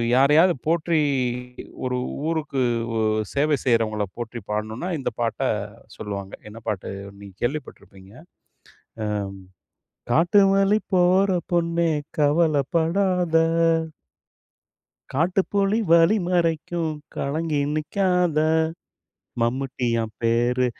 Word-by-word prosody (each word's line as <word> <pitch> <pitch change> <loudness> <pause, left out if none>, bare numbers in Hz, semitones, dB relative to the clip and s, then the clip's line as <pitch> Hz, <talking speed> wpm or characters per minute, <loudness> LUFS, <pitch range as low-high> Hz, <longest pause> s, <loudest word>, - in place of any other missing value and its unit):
யாரையாவது 150 +7 +5
போற்றி 165 0 +1 0.8
ஒரு 125 0 -1 0.3
ஊருக்கு 155 -4 -2 0.4
ஓ - - 0 0.4
சேவை 145 +1 +2
செய்கிறவங்கள 110 -4 +1
போற்றி 120 0 -5
பாடணுனா 110 +10 -3
இந்த 135 - -2
பாட்ட 115 -1 -1 0.6
சொல்லுவாங்க. 100 -1 -6 0.2
என்ன 115 +2 -10
பாட்டு! 100 -4 -3 0.3
நீங்க 100 -1 -11
கேள்விப்பட்டுருப்பீங்க. 105 -8 -6 0.9
ம் 105 -1 -1 0.9
"காட்டு 175 +5 +4
வழி 195 +2 +3
போற 185 +2 +4 0.2
பொண்ணே 170 -1 +1 0.3
கவலைப்படாத." 165 +4 +2 1.8
காட்டுப்புலி 195 +7 +1
வழி 170 +5 +6
மறைக்கும், 165 -2 0 0.2
கலங்கி 150 +1 -1
நிக்காத. 180 +1 0 1.0
மம்முட்டியான் 120 -2 -1
பேரு! 120 +2 +2
155 Hz, 85 wpm, -23 LUFS, 120-175 Hz, 1.8 s, வழி